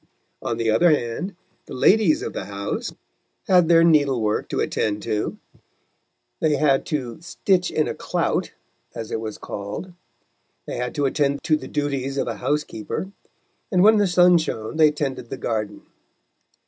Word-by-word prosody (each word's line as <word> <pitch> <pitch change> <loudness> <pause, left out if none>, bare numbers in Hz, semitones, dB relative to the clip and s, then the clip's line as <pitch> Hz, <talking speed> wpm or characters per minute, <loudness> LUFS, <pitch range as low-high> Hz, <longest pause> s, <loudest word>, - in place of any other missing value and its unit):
On 115 - -2
the 115 -1 +1
other 170 +11 +4
hand, 150 - -1 0.3
the - - -7
ladies 190 +4 +4
of - - -4
the - - -4
house 100 0 -4 0.6
had 180 -3 +5
their 165 0 +6
needlework 140 -10 +2
to - - -2
attend 105 -1 -1
to, 105 0 -2 1.0
they 155 -2 +2
had 140 -2 +2
to 130 -4 -3
"stitch 180 +1 0
in 155 - 0
a - - -2
clout," - - -1 0.4
as 115 -2 -6
it - - -1
was 110 -1 -5
called; 105 - -6 0.7
they - - -5
had 125 0 -3
to 145 - +1
attend 140 0 0
to 155 - +3
the 130 -4 -6
duties 140 -2 -2
of - - 0
a 115 -3 -3
housekeeper, 150 - -3 0.6
and, 180 -2 +4
when 215 +1 +7
the 205 -1 +3
sun 180 -1 +5
shone, 110 -4 -4
they 155 -1 +6
tended 140 -5 -4
the - - -5
garden. 110 -3 -3
145 Hz, 160 wpm, -23 LUFS, 115-170 Hz, 1.0 s, when